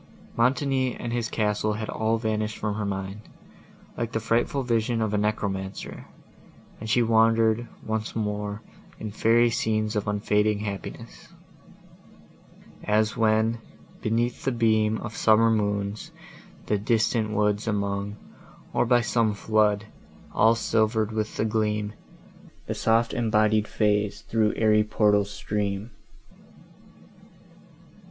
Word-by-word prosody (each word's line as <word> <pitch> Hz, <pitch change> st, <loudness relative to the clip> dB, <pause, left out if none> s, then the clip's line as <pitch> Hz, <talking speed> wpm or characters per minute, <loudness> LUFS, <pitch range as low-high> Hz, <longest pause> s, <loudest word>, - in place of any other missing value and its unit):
Montoni 130 Hz, +1 st, +1 dB
and 120 Hz, -1 st, -5 dB
his 120 Hz, -2 st, -1 dB
castle 105 Hz, 0 st, 0 dB
had 110 Hz, +1 st, -4 dB
all 110 Hz, +1 st, 0 dB
vanished 110 Hz, -1 st, -2 dB
from 105 Hz, -1 st, -2 dB
her 105 Hz, 0 st, -3 dB
mind, 95 Hz, +1 st, -4 dB, 0.7 s
like 115 Hz, 0 st, -4 dB
the 110 Hz, -, 0 dB
frightful 115 Hz, +5 st, 0 dB
vision 115 Hz, -1 st, 0 dB
of 110 Hz, -2 st, -1 dB
a -, -, +2 dB
necromancer, 100 Hz, -2 st, -3 dB, 0.7 s
and 110 Hz, -, -6 dB
she 120 Hz, +2 st, +3 dB
wandered, 115 Hz, 0 st, +3 dB, 0.2 s
once 110 Hz, 0 st, -3 dB
more, 105 Hz, -1 st, -3 dB, 0.4 s
in 110 Hz, -, -5 dB
fairy 115 Hz, +3 st, +3 dB
scenes 110 Hz, -1 st, 0 dB
of 105 Hz, -1 st, -1 dB
unfading 105 Hz, 0 st, +1 dB
happiness: 100 Hz, -2 st, -7 dB, 1.6 s
As 110 Hz, 0 st, +1 dB
when, 110 Hz, 0 st, +2 dB, 0.4 s
beneath 120 Hz, +2 st, -1 dB
the 135 Hz, -, +1 dB
beam 110 Hz, -2 st, +2 dB
Of 110 Hz, -1 st, -6 dB
summer 115 Hz, +1 st, +4 dB
moons, 105 Hz, -1 st, -1 dB, 0.6 s
the 105 Hz, -, 0 dB
distant 110 Hz, +1 st, +1 dB
woods 105 Hz, 0 st, 0 dB
among, 100 Hz, -1 st, -2 dB, 0.6 s
Or -, -, +2 dB
by 120 Hz, 0 st, +4 dB
some 115 Hz, -3 st, +1 dB
flood, 105 Hz, -1 st, +1 dB, 0.5 s
all 115 Hz, +1 st, +4 dB
silver'd 110 Hz, -1 st, +1 dB
with 110 Hz, -1 st, -3 dB
the 110 Hz, -, +1 dB
gleam, 105 Hz, -1 st, -1 dB, 0.7 s
The -, -, -3 dB
soft 115 Hz, +1 st, +1 dB
embodied 110 Hz, -2 st, +2 dB
Fays 105 Hz, -1 st, 0 dB
thro' 110 Hz, -2 st, +1 dB
airy 110 Hz, -1 st, +3 dB
portals 105 Hz, -1 st, +2 dB
stream. 105 Hz, +1 st, -3 dB
110 Hz, 120 wpm, -26 LUFS, 105-115 Hz, 1.6 s, summer